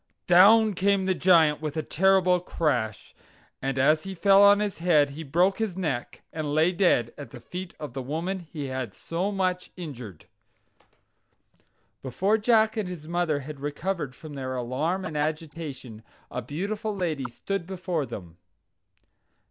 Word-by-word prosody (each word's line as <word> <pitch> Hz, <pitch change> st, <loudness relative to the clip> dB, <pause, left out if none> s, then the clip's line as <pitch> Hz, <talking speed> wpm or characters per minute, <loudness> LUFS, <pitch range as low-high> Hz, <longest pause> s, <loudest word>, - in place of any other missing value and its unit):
Down 210 Hz, +5 st, +6 dB
came 195 Hz, +1 st, +1 dB
the 190 Hz, -, +2 dB
Giant 165 Hz, -5 st, +4 dB
with 155 Hz, 0 st, -4 dB
a 155 Hz, -, -1 dB
terrible 185 Hz, +2 st, +3 dB
crash, 125 Hz, -, -2 dB, 0.5 s
and 135 Hz, 0 st, -2 dB
as 150 Hz, +4 st, +4 dB
he 195 Hz, +2 st, -7 dB
fell 195 Hz, +3 st, +5 dB
on 205 Hz, 0 st, +7 dB
his 210 Hz, -4 st, -2 dB
head, 155 Hz, -5 st, +3 dB
he 150 Hz, +3 st, -8 dB
broke 175 Hz, +7 st, +1 dB
his 210 Hz, -5 st, -2 dB
neck, 150 Hz, -10 st, -3 dB
and 150 Hz, -2 st, -3 dB
lay 160 Hz, +3 st, +4 dB
dead 170 Hz, -, +2 dB
at 145 Hz, -, -8 dB
the 125 Hz, -, -11 dB
feet 180 Hz, +9 st, -8 dB
of 150 Hz, -5 st, -7 dB
the 135 Hz, -, -4 dB
woman 165 Hz, +8 st, -3 dB
he 160 Hz, -4 st, -7 dB
had 130 Hz, -5 st, -4 dB
so 180 Hz, +5 st, -3 dB
much 185 Hz, -2 st, -1 dB
injured. 125 Hz, -, -8 dB, 1.8 s
Before 190 Hz, -, 0 dB
Jack 220 Hz, 0 st, +3 dB
and 205 Hz, -4 st, -2 dB
his 160 Hz, -4 st, -8 dB
mother 170 Hz, -4 st, 0 dB
had 145 Hz, +1 st, -9 dB
recovered 150 Hz, 0 st, -3 dB
from 155 Hz, -2 st, -10 dB
their 130 Hz, -2 st, -4 dB
alarm 145 Hz, +10 st, -2 dB
and 155 Hz, -, -6 dB
agitation, 150 Hz, -6 st, -4 dB, 0.3 s
a 125 Hz, -, -3 dB
beautiful 200 Hz, -, -4 dB
lady 160 Hz, -8 st, -2 dB
stood 185 Hz, +8 st, -4 dB
before 180 Hz, -6 st, -3 dB
them. 85 Hz, -4 st, -9 dB
165 Hz, 155 wpm, -26 LUFS, 140-190 Hz, 1.8 s, on